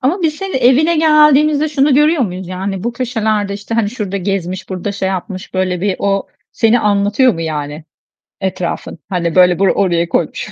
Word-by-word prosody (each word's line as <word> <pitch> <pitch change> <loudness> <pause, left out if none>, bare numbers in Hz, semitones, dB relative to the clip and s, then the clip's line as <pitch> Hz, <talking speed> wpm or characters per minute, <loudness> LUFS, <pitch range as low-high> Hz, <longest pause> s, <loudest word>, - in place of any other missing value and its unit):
Ama 335 +9 0
biz 310 -2 +1
senin 385 -3 -3
evine 270 +7 +3
geldiğimizde 305 -1 +4
şunu 285 -1 +2
görüyor 300 +1 +3
muyuz? 185 -4 -4
Yani 190 +2 -4
bu 235 - -1
köşelerde 220 -5 -1
işte 205 +3 -6
hani 225 -3 0
şurada 210 -5 -4
gezmiş, 185 -1 -3
burada 190 +2 -4
şey 195 -1 -2
yapmış 190 0 -5
böyle 185 -1 -1
bir 195 0 -1
o 195 -1 0 0.3
seni 230 +1 +2
anlatıyor 210 +5 +2
mu 165 - -6
yani, 150 -1 -4 0.6
etrafın? 180 -3 -4
Hani 170 -3 -2
böyle 180 -1 +5
bu - - +2
oraya 175 -3 +1
koymuş. 170 - -2
200 Hz, 175 wpm, -15 LUFS, 185-260 Hz, 0.6 s, böyle